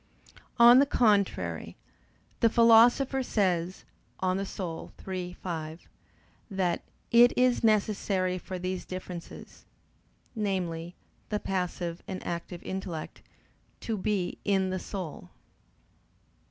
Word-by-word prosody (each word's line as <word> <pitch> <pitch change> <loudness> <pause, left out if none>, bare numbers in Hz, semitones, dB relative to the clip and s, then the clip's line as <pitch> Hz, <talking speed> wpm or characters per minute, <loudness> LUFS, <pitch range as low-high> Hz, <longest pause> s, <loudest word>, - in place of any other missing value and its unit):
On 240 +1 +9
the 280 - +4
contrary, 210 -7 +1 0.6
The 230 - +5
Philosopher 240 +4 +5
says 185 -7 -1 0.3
(De - - -2
Anima 185 -2 -3 0.2
iii, 180 -2 -4
5), 160 -3 -6 0.6
that 185 -4 0 0.3
"it 240 +1 +6
is 250 -1 +3
necessary 200 -4 +1
for 185 +1 -6
these 185 0 -3
differences," 180 -2 -8 0.7
namely, 180 -5 -2 0.3
the 210 - -1
passive 180 -3 -3
and 190 -3 -6
active 170 0 -5
intellect, 185 -4 -5 0.6
"to 225 - -2
be 195 -2 -2
in 190 -2 +1
the 185 - -2
soul." 180 - -7
190 Hz, 100 wpm, -28 LUFS, 180-215 Hz, 0.7 s, On